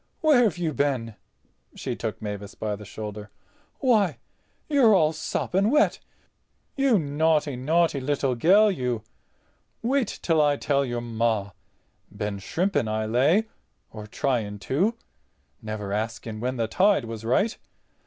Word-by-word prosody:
Where've 245 - +4
you 165 -3 -1
been?" 130 -6 -1 0.6
She - - -4
took - - -5
Mavis 105 -1 -6
by 105 -1 -3
the 105 +1 -11
shoulder. 105 0 -7 0.5
"Why, 210 - +3 0.5
you're 265 -8 +5
all 160 -3 +3
sopping 190 +5 0
wet. 300 +4 +3 0.8
You 270 -5 +3
naughty, 150 -2 +1
naughty 155 +3 +1
little 135 -1 0
gell, 200 - +5
you. 125 - -2 0.8
Wait 260 0 +1 0.2
till 165 -2 +3
I 145 -1 +3
tell 140 -1 +1
your 120 -2 -3
Ma—been 105 -2 -4
shrimping 160 - -1
I 110 0 -1
lay—or 125 - -1
trying 110 -3 -1
to—never 110 - -4
asking 110 +1 -4
when 125 +3 -2
the 115 -1 0
tide 190 - +3
was 115 -1 -7
right. 195 - +1
135 Hz, 125 wpm, -25 LUFS, -, 0.8 s, you're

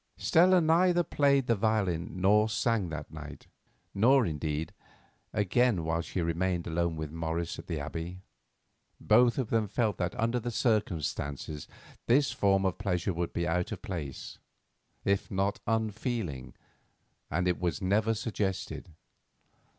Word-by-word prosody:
Stella 180 +3 +5
neither 175 +2 +4
played 140 -3 +2
the 120 - +3
violin 95 -5 0
nor 105 +3 +4
sang 110 -3 0
that 75 -2 -6
night, 75 -2 -9 0.5
nor, 125 +5 +4
indeed, 75 -1 -3 0.6
again 105 -1 +2
while 80 +1 0
she 90 - -3
remained 85 +1 -1
alone 85 0 -1
with 80 -1 -5
Morris 80 +1 -3
at - - -10
the 80 -4 -2
Abbey. 85 +5 -6 0.8
Both 120 +2 +4
of 130 -5 -2
them 110 -2 +2
felt 105 +1 0
that 90 -1 -3
under 115 +2 +1
the 120 +1 -4
circumstances 80 - -1 0.4
this 135 +4 +4
form 95 -1 +2
of 95 0 -1
pleasure 95 -2 -1
would 85 0 -2
be 85 0 -1
out 90 +1 0
of - - -6
place, 85 - -6 0.7
if 100 0 +1
not 100 +2 0
unfeeling, 110 - -2 0.7
and 90 +4 0
it 90 - +1
was 90 0 -1
never 105 +4 +1
suggested. 105 -4 -3
95 Hz, 140 wpm, -30 LUFS, 85-115 Hz, 0.8 s, Stella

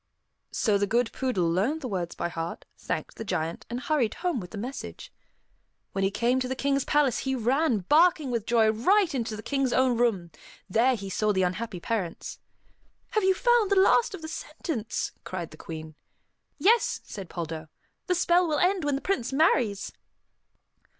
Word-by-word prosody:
So 205 -3 +1
the 205 - +1
good 235 +2 +1
poodle 245 -10 0
learned 210 - 0
the 255 - -4
words 180 -6 -3
by - - -2
heart, 165 0 -5
thanked - - -4
the - - -5
Giant, 165 -5 -3
and 240 +1 -3
hurried 260 -6 0
home 345 -7 -1
with 180 -3 -8
the 215 - -8
message. 250 +7 -7 0.8
When 195 - -1
he 195 - +3
came 235 +5 +1
to 255 - -2
the 260 - -2
King's 275 0 +1
palace, 290 -5 +2
he 265 0 -1
ran, 255 -1 +1
barking 305 - +4
with 230 -3 -2
joy, 225 -2 +4
right 360 - +3
into 230 -4 -2
the 215 - -8
King's 275 -3 0
own 255 -1 +3
room. 195 -8 +1 0.4
There 235 +6 +3
he 200 -3 -7
saw 215 +3 +1
the 190 -2 +1
unhappy 185 +2 -2
parents. 185 -3 -3 0.7
"Have 430 -3 +1
you 380 0 +4
found 480 -2 +3
the 400 - +3
last 395 +3 +4
of 325 - -11
the - - -4
sentence?" 305 - -4
cried 175 -3 -5
the 155 - -12
Queen. 160 -1 -8 0.6
"Yes," 460 +5 +3
said 195 -5 -8
Poldo. 160 -2 -5 0.4
"The 360 - +2
spell 350 0 +3
will 305 -2 0
end 370 -1 +2
when 290 -1 +1
the 275 - -3
prince 270 -11 -1
marries." 260 - +2
240 Hz, 185 wpm, -27 LUFS, 195-305 Hz, 0.8 s, barking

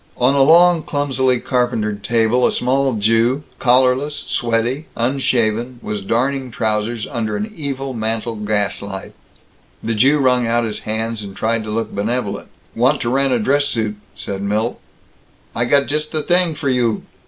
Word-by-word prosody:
On 125 +2 +3
a 140 - +3
long, 170 +3 +6
clumsily 130 -4 0
carpentered 110 -6 -1
table, 115 +3 +2
a - - 0
small 135 +1 +1
Jew, 115 +6 +2 0.2
collarless, 130 +3 +2
sweaty, 120 +5 -1
unshaven, 120 -1 0
was 105 -1 -3
darning 130 +6 -1
trousers 110 0 -1
under 110 -3 -3
an 215 +1 -4
evil 135 -4 -4
mantle 115 0 -2
gaslight. 100 -2 -2 0.7
The 115 - -1
Jew 135 +7 +4
wrung 125 -3 +2
out 120 +1 +1
his 110 -2 -3
hands 110 0 -2
and 100 -2 -8
tried 115 0 0
to - - -6
look 110 0 -2
benevolent. 105 0 -2 0.3
"Want 130 +5 +2
to 120 - -1
rent 135 +1 +2
a 125 - +3
dress 140 +6 +2
suit," 110 -6 -1 0.2
said 100 -1 -4
Milt. 105 +3 -1 0.8
"I 120 - +1
got 140 +3 +3
just 150 +1 -2
the 155 -2 -2
t'ing 175 0 +2
for 145 -2 -2
you!" 120 -4 +1
120 Hz, 160 wpm, -19 LUFS, 110-135 Hz, 0.8 s, long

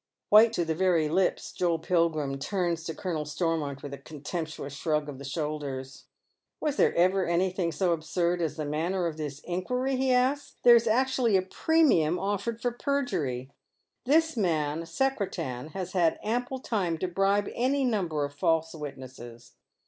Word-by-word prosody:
White 220 +2 +7
to 175 -6 0
the 160 - 0
very 170 -2 +2
lips, 180 +4 0
Joel 175 -2 0
Pilgrim 160 -5 0
turns 170 +1 -1
to 160 - -4
Colonel 170 -5 -3
Stormont 150 -3 -2
with 140 -1 -6
a 140 - -7
contemptuous 150 0 -6
shrug 150 0 -1
of 140 -3 -7
the - - -8
shoulders. 140 -2 -4 0.3
" - - -54
Was 300 -2 -1
there - - +3
ever 185 +2 +3
anything 180 0 0
so 180 +1 0
absurd 170 +2 -1
as 160 -3 -1
the 155 - -3
manner 170 +5 -1
of 160 -2 -3
this 145 -2 -5
inquiry? 250 +10 -1
" - - -2
he 260 0 +1
asks. 260 +3 +1
" - - -45
There 240 -1 +9
is 230 0 +3
actually 245 -2 +3
a 185 - 0
premium 190 - +2
offered 205 +4 -2
for 245 - +1
perjury 185 - -2 0.5
1 280 +4 +3
This 320 -1 +3
man, 165 -5 0
Secretan, 180 - -2
has 185 -2 -4
had 175 -3 +2
ample 245 +4 -1
time 195 -10 -1
to 185 - -2
bribe 195 +3 +1
any 265 +3 +1
number 175 - 0
of 145 - -8
false 160 +2 +1
witnesses. 130 -5 -9
175 Hz, 175 wpm, -28 LUFS, 150-215 Hz, 0.5 s, There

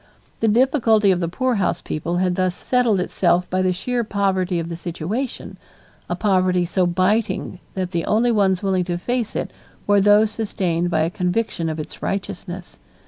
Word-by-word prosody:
The 225 - +1
difficulty 225 -3 +4
of 180 - +1
the 170 - -1
poorhouse 245 +2 0
people 170 +3 -3
had 180 0 +1
thus 185 -1 0
settled 245 -4 +1
itself 180 0 +1
by 185 0 +1
the 185 0 +2
sheer 240 +7 -1
poverty 190 -4 0
of 165 -1 -2
the 170 - -5
situation, 175 - -5 0.5
a - - 0
poverty 185 -3 +2
so 180 +1 +1
biting 185 +1 0 0.2
that 185 -1 -2
the 170 -2 -1
only 230 +3 +2
ones 195 -3 +2
willing 190 -2 +1
to 175 -1 -2
face 240 +4 -2
it - - -3 0.3
were 205 -1 +4
those 205 +2 +5
sustained 180 -6 -1
by 160 -2 +1
a 165 +2 0
conviction 180 -2 -1
of 155 0 -4
its 155 - -8
righteousness. 190 -2 -5
185 Hz, 175 wpm, -21 LUFS, 175-215 Hz, 0.5 s, those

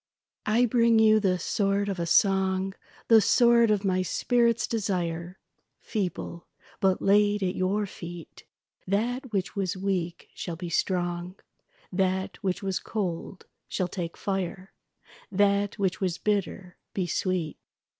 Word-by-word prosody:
I 230 +3 +4
bring 235 -1 +4
you 215 -1 +6
the 190 -3 +1
sword 200 +2 0
of 195 -3 -3
a 170 - -1
song, 190 +1 +2 0.3
The 225 -2 +7
sword 235 +1 +5
of 210 -1 +1
my 185 -1 +2
spirit's 235 +5 +2
desire, 180 -5 -2 0.4
Feeble; 180 -4 -4 0.3
but 190 -1 +2
laid 205 0 +3
at 180 -1 0
your 195 +3 0
feet, 175 -3 -10 0.4
That 240 +6 -1
which 195 -3 -2
was 190 -2 -1
weak 185 -3 -2
shall 170 - -5
be 175 +1 -6
strong, 175 0 -1 0.6
That 190 +1 0
which 190 -1 -2
was 190 -1 -1
cold 185 -3 -4 0.2
shall 185 - -1
take 175 -2 -5
fire, 190 -1 -3 0.6
That 200 +1 +2
which 190 -2 -1
was 180 -2 0
bitter 195 -3 -2 0.2
be 185 - 0
sweet. 175 -2 -2
190 Hz, 135 wpm, -27 LUFS, 180-210 Hz, 0.6 s, The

